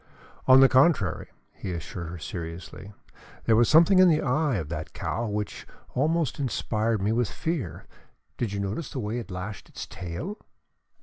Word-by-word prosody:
"On 130 +1 +8
the 135 - +9
contrary," 130 - +3 0.3
he 95 - -5
assured 85 +1 -6
her 90 - -6
seriously, 85 +4 -7 0.5
"there 115 - +4
was 115 +1 +4
something 170 +5 +6
in 185 -1 +8
the 155 -2 +2
eye 145 0 +1
of 85 -7 -2
that 80 -1 -5
cow 115 +1 -2
which 105 -1 -4 0.3
almost 155 +2 +1
inspired 110 -5 0
me 105 - +2
with 120 0 +1
fear. 160 - -3 0.5
Did 115 -4 -2
you 100 - -3
notice 100 +11 -3
the 135 - -5
way 110 +1 -2
it 115 - -8
lashed 95 +2 -6
its - - -7
tail?" 95 - -6
110 Hz, 170 wpm, -27 LUFS, 95-140 Hz, 0.5 s, the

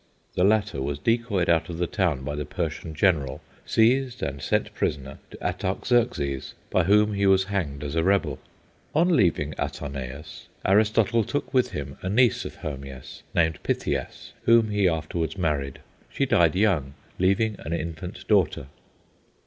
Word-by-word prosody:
The 90 - +1
latter 105 -7 +2
was 70 +1 -2
decoyed 115 - 0
out 80 0 +2
of 85 - -5
the 90 - 0
town 85 -8 0
by 70 +2 -3
the 75 0 -3
Persian 80 +1 -4
general, 75 -7 +1 0.3
seized 125 +2 +2
and 70 0 -3
sent - - 0
prisoner 65 -2 -3
to - - -11
Artaxerxes, 70 - 0 0.2
by - - +3
whom 105 +2 +4
he 100 0 +1
was 95 0 +5
hanged 85 -8 -3
as 75 0 -4
a 80 - +2
rebel. 85 -7 +1 0.6
On 170 +2 +4
leaving 85 - +2
Atarneus, 70 +1 -6 0.2
Aristotle 110 +3 +3
took 145 +8 -3
with 130 -2 +3
him 70 -1 -6
a 90 - -3
niece 120 +4 +3
of - - -7
Hermias, 70 -3 -7
named 80 -2 +2
Pythias, - - -3
whom 115 -2 +5
he 100 -3 +3
afterwards 80 +2 -2
married. 75 -6 -1 0.3
She - - 0
died - - +3
young, 90 -9 +1 0.2
leaving 100 +4 +2
an 80 - -7
infant 85 +2 -5
daughter. 95 -9 +2
85 Hz, 155 wpm, -25 LUFS, 75-105 Hz, 0.6 s, was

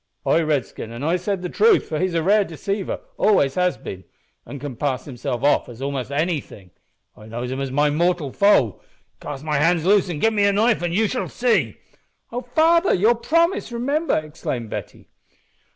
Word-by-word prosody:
"Ay, 165 - +3
Redskin, 145 -7 -2
an' 120 +3 -7
I 165 +4 +2
said 185 +1 -2
the - - -1
truth, 435 - +3
for 155 - -3
he's 185 -2 -1
a 165 - +1
rare 205 +4 +4
deceiver 195 +3 -4 0.2
always 145 -10 +3
has 180 0 +1
been 95 -1 -8 0.4
an' 145 - -7
can 140 -2 -6
pass 130 0 -2
himself 130 -2 -4
off 145 - +3
for 120 - -9
a'most 135 +1 -4
anything. 145 - -3 0.4
I 105 - -14
knows 120 +3 -5
him 130 - -3
as 135 - -2
my 145 +3 +2
mortal 170 -2 0
foe. 200 - +3 0.4
Cast 145 -1 -7
my 150 -2 0
hands 165 +2 +2
loose 195 -1 +3
an' 170 - -3
give 225 +8 +2
me 205 -1 +2
a 200 - +3
knife 220 +1 +2
an' 175 -1 -1
you 215 +5 +2
shall 250 +4 -3
see." 245 -1 0 0.5
"O 245 +1 -3
father! 325 +8 +3
your 215 +6 +4
promise 335 +7 +1
remember!" 280 +7 0
exclaimed 150 -7 -5
Betty. - - -7
170 Hz, 190 wpm, -22 LUFS, 140-210 Hz, 0.5 s, rare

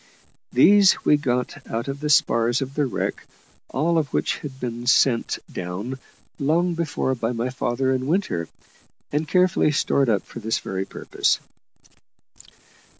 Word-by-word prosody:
These 195 +9 +5
we - - +6
got 130 -1 -2
out 115 +3 -3
of 140 0 -4
the 150 +1 -3
spars 120 -4 +3
of 135 +1 -8
the 145 -1 0
wreck, - - -3 0.4
all 165 +4 +1
of 145 -3 -3
which - - -1
had 135 -3 -8
been 120 -1 -5
sent 125 -1 +3 0.2
down 100 +9 -5 0.4
long 170 +5 +1
before 155 -5 -1
by 115 -1 -2
my 120 +2 -2
father 130 +1 -1
and 130 0 -2
Winter, 125 - 0 0.6
and 150 +2 -1
carefully 180 -2 +3
stored 140 -3 +1
up 105 -3 +1
for - - -10
this 110 0 -1
very 95 0 -4
purpose. - - -1
130 Hz, 150 wpm, -23 LUFS, 120-150 Hz, 0.6 s, we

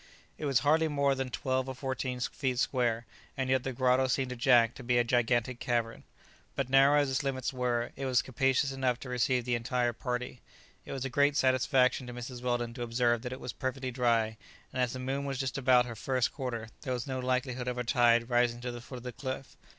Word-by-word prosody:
It - - -3
was 135 -5 +2
hardly 160 +3 +3
more 140 -2 +2
than 135 -1 -3
twelve 130 +1 -1
or 130 - -5
fourteen 130 -1 -3
feet 130 0 -2
square, 120 -3 0 0.3
and 130 -1 -1
yet 130 -1 +3
the 135 - -2
grotto 130 +1 +2
seemed 130 0 0
to - - -4
Jack 120 -1 +4
to 135 - -10
be 125 0 +2
a 120 - +4
gigantic 120 0 +1
cavern. 115 -2 -1 0.5
But 135 -2 -2
narrow 135 +2 +6
as 145 -2 +1
its 130 - +1
limits 135 -1 -2
were, 125 -2 -1
it 135 - -3
was 125 -2 +3
capacious 135 +1 +1
enough 130 -2 0
to 125 - -7
receive 125 0 +1
the 125 - 0
entire 120 0 0
party. 125 +1 -4 0.4
It - - -8
was 135 -1 -3
a - - -2
great 145 +2 +3
satisfaction 130 0 +2
to 125 - -7
Mrs. 120 0 -7
Weldon 120 -1 -1
to 120 - -8
observe 120 0 +1
that 125 0 -5
it 130 - -6
was 125 -3 -6
perfectly 130 -1 -3
dry, 115 -3 +1 0.4
and 130 - -1
as 125 -2 0
the - - -5
moon 135 +2 -2
was 135 -1 -3
just 135 +1 -2
about 125 -2 +5
her 120 - -6
first 130 +2 0
quarter 120 -5 -4
there 130 - -2
was 125 +1 -3
no 130 -2 -3
likelihood 125 0 -1
of 125 0 -2
a 125 - -1
tide 120 -1 +3
rising 120 -1 +2
to 125 0 -3
the 120 0 -8
foot 125 +1 -9
of 120 - -10
the 125 - -5
cliff. 130 +2 -6
125 Hz, 230 wpm, -30 LUFS, 120-130 Hz, 0.5 s, narrow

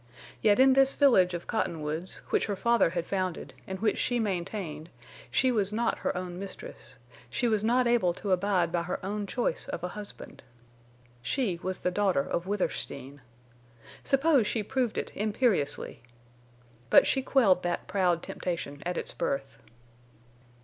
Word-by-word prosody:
Yet 210 +1 +4
in 265 0 +7
this 270 0 +4
village 190 -11 +4
of 175 - -6
Cottonwoods, 160 -4 -2
which - - +2
her 205 - -1
father 235 0 +3
had 170 -1 -3
founded 185 -3 -3
and 190 0 -5
which 220 +1 +1
she 245 -1 0
maintained 175 -6 -3 0.4
she 260 - +2
was 205 -4 +2
not 230 +3 0
her - - -2
own 180 -1 -5
mistress; 200 - -8 0.3
she 245 - 0
was 215 -2 +1
not 245 +3 +3
able 235 -7 +3
to 200 - -4
abide 185 -2 +2
by 170 -1 0
her 175 +2 -3
own 205 +1 -3
choice 235 -6 -2
of 170 - -5
a 180 - -2
husband. 210 +2 -9 0.8
She 195 - -1
was 185 0 -3
the 180 - 0
daughter 190 -6 +2
of 170 +2 -2
Withersteen. 145 -8 -3 0.8
Suppose 275 -4 +3
she 220 - -1
proved 250 0 -1
it, - - -3
imperiously! 205 - 0 0.9
But - - +7
she 265 - +1
quelled 225 -9 +3
that 175 0 -2
proud 180 -3 +1
temptation 155 -5 -4
at 175 0 -2
its - - -3
birth. 135 -5 -3
195 Hz, 155 wpm, -29 LUFS, 175-230 Hz, 0.9 s, in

